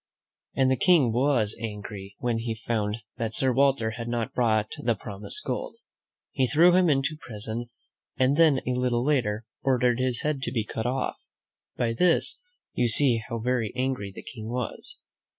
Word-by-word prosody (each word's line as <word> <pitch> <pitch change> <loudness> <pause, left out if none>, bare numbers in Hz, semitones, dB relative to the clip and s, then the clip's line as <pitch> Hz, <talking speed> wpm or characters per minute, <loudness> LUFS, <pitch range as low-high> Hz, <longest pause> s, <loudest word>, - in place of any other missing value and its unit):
And 130 -1 +3
the 130 - +2
King 145 -7 +4
was 120 -4 +2
angry 105 -2 -6
when 120 -2 -1
he 115 -1 -3
found 110 -1 -2
that 110 -1 -3
Sir 130 -1 +2
Walter 135 -4 +2
had 115 +2 -6
not 120 -2 -2
brought 110 -3 +1
the 120 -1 +1
promised 105 - -7
gold. - - -3 0.6
He 130 -2 +1
threw 165 +6 +6
him 180 -1 +4
into 140 +2 +1
prison, 115 -3 -5 0.5
and 130 +2 +3
then 155 -4 +4
a 125 - 0
little 125 -1 0
later 120 -7 +1 0.2
ordered 125 -2 +2
his 130 -2 0
head 150 -3 -1
to - - -2
be 115 -5 0
cut 110 +1 -3
off. 130 +1 -1 0.6
By 115 -1 0
this 175 +7 +2 0.3
you 120 - +2
see 120 -1 +3
how 115 - -2
very 115 -2 -1
angry 125 -6 -2
the - - -10
King 110 -2 -8
was. 125 - -4
120 Hz, 170 wpm, -26 LUFS, 110-135 Hz, 0.6 s, threw